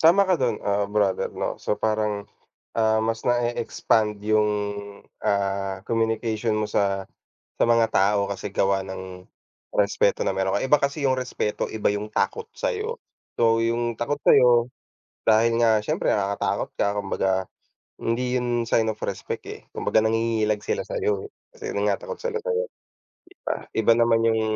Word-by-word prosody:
tama 175 +5 +6
ka 185 -1 +3
do'n, 120 -4 +1
ah, 100 0 +1
brother 100 -2 +1
'no - - -4
so 105 - -1
parang, 105 -2 -1 0.5
ah, 110 -1 +2
mas 115 0 -1
na 120 - +4 0.2
e-expand 110 -2 0
yung, 105 0 +3 0.7
ah, 100 -1 -1
communication 115 -1 0
mo 110 - 0
sa, 100 -2 0 0.5
sa - - +1
mga 115 -1 +4
tao 100 +1 +2
kasi 100 0 -5
gawa 95 -1 +1
ng, 95 -1 -8 0.5
respeto - - +2
na - - 0
mayro'n 95 0 +1
ka - - -2
iba 150 - +6
kasi 140 +2 -1
yung 130 - +3
respeto 125 -4 -2
iba 110 - -1
yung 105 +1 -2
takot 455 - -1
sa'yo. 470 -1 -3 0.4
So 115 -1 +4
yung 115 0 0
takot 145 +5 -2
sayo, 120 -1 +5 0.6
dahil 115 +1 +4
nga 110 -2 +4
siyempre - - -1
nakakatakot 100 -1 0
ka 100 0 +1
kumbaga 95 -1 -1 0.7
hindi 125 +2 0
'yon 120 -1 0
sign 115 0 +3
of 110 -1 -3
respect, - - -4
eh, - - -9
kumbaga - - +1
nangingilag 110 -1 +1
sila - - -2
sayo, 430 -3 -1
eh, - - -17 0.3
kasi 440 -2 -6
'yun - - +1
nga - - 0
takot - - -7
sila 475 -1 -1
sayo, 475 +1 -2 0.6
'di 370 - -20
ba? - - -2
Iba 110 +1 +4
naman 115 -1 +4
yung 110 -1 +2
115 Hz, 165 wpm, -24 LUFS, 105-125 Hz, 0.7 s, tama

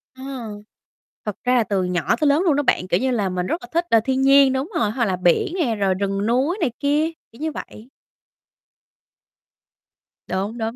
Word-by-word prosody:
Ờ. 260 - -11 1.0
Thật 210 -3 -3
ra 250 0 +2
là 240 - +4
từ 200 -3 -1
nhỏ 180 -2 0
tới 305 - +1
lớn 285 +3 +3
luôn 330 -6 +3
đó 290 - +1
bạn, 185 -7 +1
kiểu 180 0 +1
như 260 +1 0
là, 210 -6 0
mình 180 -1 -2
rất 335 - -2
là 360 - -9
thích, 340 +1 +1
ờ, 225 - +5
thiên 265 0 0
nhiên, 275 0 +6
đúng 265 +5 -2
rồi, 215 -2 +1
hoặc 235 +1 0
là 190 -3 0
biển 180 - +1
nè, 280 -12 0
rồi 195 -2 +1
rừng 195 +1 -2
núi 260 - +1
này 245 - +1
kia, 295 +2 +1 0.2
kiểu 230 - -17
như 315 0 -1
vậy. 230 -4 -9 2.4
Đúng, 200 +5 -3
đúng, 225 0 -3
240 Hz, 205 wpm, -21 LUFS, 200-285 Hz, 2.4 s, nhiên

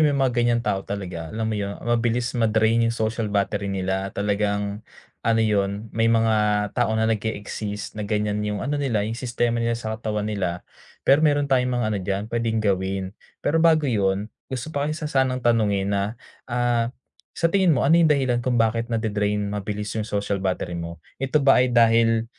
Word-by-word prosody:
may 145 - 0
mga 135 -2 +2
ganyang 120 0 +2
tao 95 -5 0
talaga. 90 -5 -5
Alam 110 +2 -2
mo - - -1
yun, 100 0 -3
mabilis 120 0 0
ma-drain 115 0 +2
'yung 115 - 0
social 110 -1 -1
battery 100 0 -1
nila. 95 0 -2
Talagang, 100 0 -1 0.4
ano 115 0 +2
yun, 100 0 0
may 115 +1 +1
mga 105 -2 +2
tao 120 -2 +1
na 110 - +2
nag-e-exist 105 -1 -3
na 105 - -3
ganyan 105 -1 0
'yung 105 -1 -2
ano 145 +2 -1
nila, 115 -7 0
'yung 115 +3 -4
sistema 120 -1 -1
nila 115 0 0
sa 110 -2 -4
katawan 105 -2 -2
nila. 90 -4 -3 0.4
Pero 140 +2 +5
meron 145 -2 +3
tayong 125 -1 +2
mga 120 -2 0
ano 105 - -1
diyan, 95 +2 -2
pwedeng 115 -1 0
gawin. 95 -1 0 0.4
Pero 160 +3 +2
bago 160 -2 +4
yun, 100 -3 0 0.2
gusto 130 +4 -5
pa 145 0 -1
kita 155 -1 -4
sanang 130 -2 +1
tanungin 105 -4 +2
na, 100 -1 +1 0.5
ah, 120 -1 +1 0.5
sa 165 0 +1
tingin 185 -6 +4
mo 125 - +1
ano 165 +4 +5
'yung 165 - +5
dahilan 130 -5 +2
kung 120 0 0
bakit 115 +1 +1
na-dre-drain 105 -3 -1
mabilis 105 +1 -4
'yung 110 -1 -3
social 100 -1 -1
battery 95 -2 -2
mo? 85 -1 -6 0.2
Ito 135 +1 0
ba 135 -2 +6
ay 125 - +3
dahil, 115 -1 +4
110 Hz, 185 wpm, -23 LUFS, 100-120 Hz, 0.5 s, ba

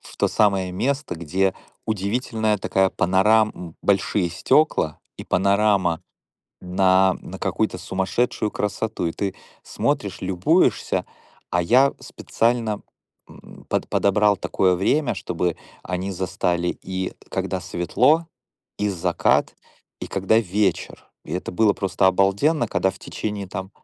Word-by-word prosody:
в - - -14
то - - +2
самое 95 -3 +2
место, 135 +5 -1
где 95 +4 0 0.3
удивительная 110 +1 -1
такая 95 0 +1
панорам 105 +4 +3
м, 85 -2 -10
большие 100 -2 +1
стёкла 85 - +2 0.2
и - - -8
панорама 100 -3 +2 0.6
на 95 +1 +3
на - - -9
какую-то - - -1
сумасшедшую 105 +3 -1
красоту. 105 -2 -2
И 80 - -2
ты 100 -2 -3 0.3
смотришь, 105 -10 -2
любуешься. 95 -1 +1 0.5
А 85 0 +1
я 130 +9 +4
специально, 115 -2 -1 0.5
м, - - -15
под - - -1
подобрал 105 +1 +3
такое 95 -1 +1
время, 120 - +1
чтобы 90 -2 -2 0.3
они 95 +2 -3
застали 90 -1 -1
и 95 0 -3 0.2
когда - - -2
светло, 135 - +2 0.5
и 105 - 0
закат, 90 -2 +1 0.5
и - - -5
когда 95 +3 +2
вечер. 100 -3 -1 0.2
И - - -8
это 90 - -3
было 105 +2 +3
просто 95 -1 +1
обалденно, 100 - +2
когда 95 - +1
в 95 - -15
течение 105 -2 -5
там 95 +1 -6
95 Hz, 125 wpm, -23 LUFS, 90-110 Hz, 0.6 s, я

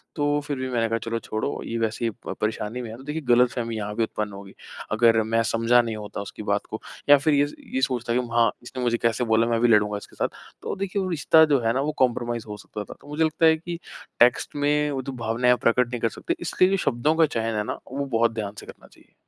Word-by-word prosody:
तो 145 -1 +1
फिर 145 -2 -2
भी 130 0 -3
मैंने 115 -2 0
कहा, 115 - +1
"चलो 115 +1 -3
छोड़ो, 110 +5 -3
ये 115 - -3
वैसे 115 +1 -1
ही 115 - 0 0.2
प - - -2
परेशानी 110 +2 -2
में 120 - -6
है।" 110 - -8
तो 130 - -12
देखिए 150 +3 -4
गलतफ़हमी 120 -1 +2
यहाँ 105 0 -4
पे 115 - +1
उत्पन्न 105 -2 -3
होगी। 100 0 -10 0.4
अगर 115 0 +4
मैं 115 +1 +1
समझा 115 +2 +4
नहीं 115 -2 -4
होता 105 -1 -6
उसकी 100 - -8
बात - - -1
को - - -6 0.3
या 145 - +9
फिर 150 +2 +1
ये 145 0 +3
स - - -11 0.2
ये 130 - 0
सोचता 120 -3 0
कि, 125 - +2
"हाँ, 115 -2 +4
इसने 125 +1 -6
मुझे 120 -1 +1
कैसे 115 +1 0
बोला? 115 +1 +4
मैं 115 -1 +1
भी 120 - +5
लड़ूँगा 105 -2 +3
इसके 100 - -12
साथ।" - - 0 0.3
तो - - -4
देखिए 195 0 -2
वो 185 - -2
रिश्ता 160 -1 +5
जो 140 - +4
है 115 - +3
ना 135 - 0
वो 150 - -1
कंप्रोमाइज़ 120 -2 -1
हो 105 -1 -6
सकता 105 0 -7
था। - - -10
तो - - -17
मुझे 150 +2 0
लगता 160 +1 +2
है 160 0 +6
कि 170 +1 -6 0.4
टेक्स्ट 120 +4 +3
में 150 +1 +1
वो 135 -2 -2
जो 135 +1 -6
भावनाएँ 125 +2 +3
आप 125 - -3
प्रकट 120 +1 +3
नहीं 120 - -3
कर 115 - +2
सकते। - - -14 0.2
इसलिए 185 - +2
जो 195 - +2
शब्दों 140 -2 +1
का 165 0 +5
चयन 115 -5 -2
है 105 - 0
ना - - -5
वो 140 +1 -2
बहुत 115 0 +3
ध्यान 105 -3 -4
से - - -11
करना - - -13
चाहिए। - - -24
120 Hz, 270 wpm, -24 LUFS, 115-145 Hz, 0.4 s, या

